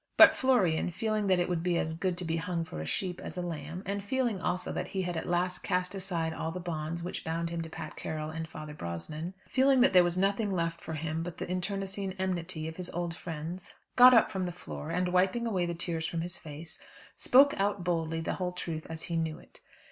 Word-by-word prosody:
But - - +10
Florian 200 -12 +3
feeling 215 +3 -1
that 185 -1 +4
it 175 - +1
would 175 -2 0
be 175 0 +1
as 160 - 0
good 175 +2 -1
to 180 - -4
be 165 0 0
hung 165 0 -2
for 80 - -6
a 80 - -5
sheep 180 - -2
as - - -7
a 180 - -1
lamb, 165 +1 -5
and 200 +1 -2
feeling 235 -3 0
also 180 0 -1
that - - -3
he 190 -1 -2
had 175 -1 -2
at 160 - -3
last 180 +1 +1
cast 180 0 0
aside 175 -4 -2
all 160 - -3
the 180 - -5
bonds 170 -1 -3
which 180 - -4
bound 165 +1 -2
him 170 -1 -2
to 165 - -6
Pat 155 -1 -7
Carroll 155 0 -4
and 160 0 -4
Father 155 -1 -8
Brosnan, 150 - -5
feeling 265 0 +4
that 265 - +5
there 180 -1 +8
was 175 0 +1
nothing 200 +2 +1
left 165 -2 -1
for 160 - -6
him 160 +1 -2
but 175 0 -5
the - - -4
internecine 195 +1 -2
enmity 180 -3 -2
of 160 - -7
his 180 -1 -1
old 170 -1 -3
friends, 170 +2 -6 0.2
got 250 0 +10
up 225 - +5
from 190 -3 -2
the 175 - -2
floor, 75 - -7
and 180 0 0
wiping 190 +6 +3
away 185 -6 0
the 170 - -2
tears 165 -1 0
from 165 0 -2
his 175 +1 -4
face, 155 +1 -8 0.4
spoke 280 +3 +6
out 200 -1 0
boldly 165 -2 0
the - - -1
whole 180 -1 -2
truth 165 -3 -5
as 160 0 -4
he 170 - -3
knew 160 -1 -1
it. - - -15
175 Hz, 240 wpm, -30 LUFS, 160-190 Hz, 0.4 s, But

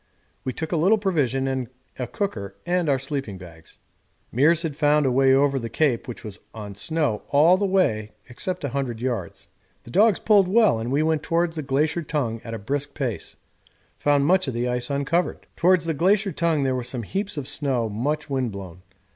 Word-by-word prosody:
We 130 - -2
took 160 +5 -5
a 170 - +1
little 190 +8 +4
provision 145 - 0
and 130 -2 -2 0.3
a 125 - -2
cooker 100 - -4
and 175 -2 +1
our 135 - +3
sleeping 135 -6 -4
bags. 85 -3 -14 0.6
Meares 155 +7 +4
had 155 -4 -3
found 150 -1 +3
a 130 - +2
way 135 +1 +4
over 135 0 +3
the 115 -2 -5
Cape 130 -1 +1
which 120 - -7
was 105 -2 -7 0.2
on 105 -2 -7
snow 145 0 -1
all 155 +6 +5
the 200 +1 0
way 110 - +1
except 180 +9 -4
about 140 - -1
100 130 -5 -2
yards. 120 -8 -4 0.4
The 120 - -12
dogs 210 - +4
pulled 205 -4 +4
well, 210 - +4
and 115 +2 -3
we 145 +3 +2
went 160 -1 +1
towards 170 +1 0
the 155 - -2
Glacier 150 +4 0
Tongue 135 -8 -2
at 115 -1 -5
a - - -4
brisk 140 +7 -3
pace; 125 -7 -3 0.6
found 145 -1 +3
much 185 +1 +3
of 130 - -3
the 120 +1 -1
ice 125 0 -2
uncovered. 140 +5 -1
Towards 180 0 +3
the 165 - 0
Glacier 195 +6 +2
Tongue 165 -5 +1
there 130 -1 +1
were 130 - -1
some 125 0 -5
heaps 200 - -3
of 140 -3 -4
snow 135 -5 -1
much 140 +9 -2
wind 130 -5 -1
blown. 95 -3 -9
140 Hz, 205 wpm, -24 LUFS, 120-165 Hz, 0.6 s, all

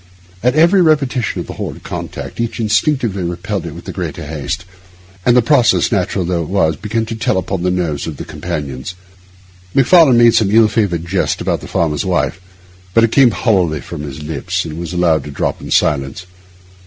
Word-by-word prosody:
At 125 +3 +2
every 170 +5 +5
repetition 140 - +1
of - - -7
the - - -7
horrid - - -6
contact - - -6
each 115 +1 -3
instinctively 110 -1 +1
repelled 90 +1 -3
it 80 - -8
with 85 - -11
the - - -5
greater 85 -3 -5
haste; 75 +3 -4 0.6
and 120 0 +5
the 125 - +5
process, 125 -2 +3
natural 95 -2 0
although 85 0 -1
it 80 - -5
was, 85 -5 +2
began 110 +4 -2
to 115 0 -5
tell 120 -1 0
upon 95 0 -2
the 90 - +1
nerves 85 -6 -2
of - - -6
the - - -7
companions. 70 +3 -5 0.8
Macfarlane 135 -1 +6
made 120 -1 +6
some 105 -3 +3
ill 110 +1 +5
favoured 100 -6 -1
jest 90 +2 -1
about - - -1
the - - -9
farmer's 75 -3 0
wife, 90 -1 -1 0.5
but 115 - +5
it 115 - +3
came 135 -1 +6
hollowly 95 - +1
from 75 - -7
his 75 0 -7
lips, 75 0 -3
and 80 0 -6
was 85 -1 -5
allowed 85 -3 +2
to - - -7
drop 70 - -2
in - - -8
silence. 70 +5 0
95 Hz, 195 wpm, -16 LUFS, 80-115 Hz, 0.8 s, Macfarlane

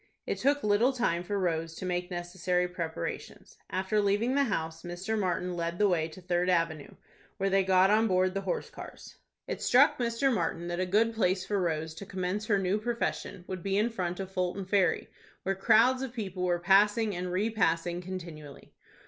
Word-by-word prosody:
It - - -3
took 285 +2 +2
little 210 +6 +3
time 200 -9 0
for 200 +3 -3
Rose 165 -3 -1
to 185 - -6
make 180 0 -2
necessary 180 0 -1
preparations. 170 - -6
After 190 +3 0
leaving 205 +5 +1
the 280 0 +3
house, 165 -7 -3
Mr. 175 +5 -4
Martin 180 -3 -1
led 170 0 -3
the 210 - +4
way 165 -4 +1
to 165 - -12
Third 180 0 0
Avenue, 165 -4 0 0.4
where 195 0 0
they 195 0 +4
got 190 +1 +4
on 220 +1 +4
board 185 -1 +2
the 195 - -2
horse 190 -2 -3
cars. - - -11 0.3
It - - -5
struck - - +4
Mr. 240 +2 +1
Martin 170 -2 -2
that 175 +1 -3
a 185 - 0
good 220 +5 +2
place 185 -3 +1
for 205 -1 0
Rose 160 -2 -1
to 195 +4 -9
commence 190 +3 -3
her 205 - +3
new 195 +2 0
profession 230 -5 -3
would 185 -1 -5
be 195 +2 0
in 225 +3 +2
front 180 -4 -3
of 190 -1 -5
Fulton 185 +1 -2
Ferry, 190 -1 +1 0.4
where 195 - 0
crowds 230 +6 +4
of 265 -3 -4
people 195 -6 -5
were 180 -1 +1
passing 205 +4 +3
and 180 0 -3
repassing 180 -4 0
continually. 170 -6 -9
185 Hz, 190 wpm, -29 LUFS, 175-210 Hz, 0.4 s, the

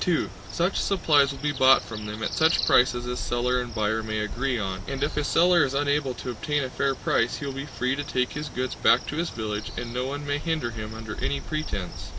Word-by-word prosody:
(2) 175 -3 +1 0.2
Such 175 +3 0
supplies 150 -8 +3
will 140 - -7
be 150 +1 -1
bought 135 -2 +5
from 110 -2 -7
them 105 +1 -5
at - - -2
such 160 +1 +3
prices 125 -1 +4
as 125 0 -3
seller 125 +1 0
and 120 -2 -7
buyer 110 0 +1
may 110 0 -3
agree 120 +5 -1
on, 95 -3 -3
and 135 0 -2
if 145 - -1
a 150 - 0
seller 175 +2 +4
is 135 -1 -1
unable 145 -2 +1
to 125 - -5
obtain 145 +6 -1
a 130 - -4
fair 135 0 0
price 115 -1 +1
he 140 - -5
will 140 - -3
be 135 +2 -5
free 130 -1 -1
to 145 - -3
take 130 -3 -1
his 150 0 -4
goods 130 0 -3
back 120 - +4
to 150 - -5
his 170 +1 0
village 105 -2 -4
and 120 -1 -4
no 125 +1 -1
one 145 +2 -4
may 145 0 -1
hinder 155 -7 -1
him 110 -1 -6
under 110 -1 -6
any 140 - 0
pretense. 135 - -5
130 Hz, 245 wpm, -26 LUFS, 115-145 Hz, 0.2 s, bought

